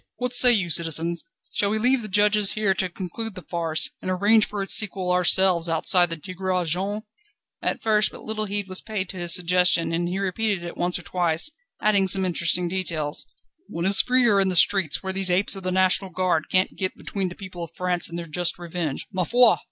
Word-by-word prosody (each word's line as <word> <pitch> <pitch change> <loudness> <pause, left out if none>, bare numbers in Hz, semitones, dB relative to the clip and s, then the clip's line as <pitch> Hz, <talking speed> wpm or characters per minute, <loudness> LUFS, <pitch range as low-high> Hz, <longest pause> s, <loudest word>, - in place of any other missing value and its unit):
What 250 0 -4
say 245 0 +7
you, 190 -7 0
citizens? 165 +1 +1 0.3
Shall 200 - +1
we 215 - -1
leave 250 +3 +1
the 215 - -7
judges 210 0 +2
here 210 -3 0
to 185 -1 -1
conclude 190 +4 -6
the 185 - -9
farce, 165 -2 -1
and - - -5
arrange 205 +4 +3
for 205 -1 -5
its 195 - 0
sequel 190 -3 +2
ourselves 180 -1 +3
outside 175 +2 +2
the 165 - -5
'Tigre 185 +2 -3
Jaune'?" 195 +6 -2 0.6
At - - -2
first 215 -1 +2
but - - -13
little 215 0 -3
heed 205 -1 -4
was 185 0 0
paid 205 -4 -5
to 190 - -9
his 175 -1 +1
suggestion, 180 -1 +2
and 175 +1 -2
he 185 - -4
repeated 195 0 -2
it 170 - -8
once 175 0 -1
or 180 - -11
twice, 175 - +2 0.3
adding 200 -2 +2
some 190 +1 +2
interesting 175 0 0
details: 170 -5 -3 0.4
"One 170 +1 -5
is 195 +1 +6
freer 245 -5 +2
in 190 - +1
the 185 - -2
streets, 175 -2 +3
where 190 0 -4
these 190 -1 +1
apes 185 +3 +1
of 195 - -7
the 185 0 -3
National 185 +1 +1
Guard 180 -3 -2
can't 185 0 0
get 185 -1 -4
between 195 -2 -4
the 180 - -10
people 185 -3 -9
of 165 0 -11
France 180 -2 -1
and 170 - -7
their 170 - -6
just 170 +2 -1
revenge. 170 -4 -5
_Ma 185 -2 -2
foi! 245 -1 +4
185 Hz, 215 wpm, -23 LUFS, 175-205 Hz, 0.6 s, say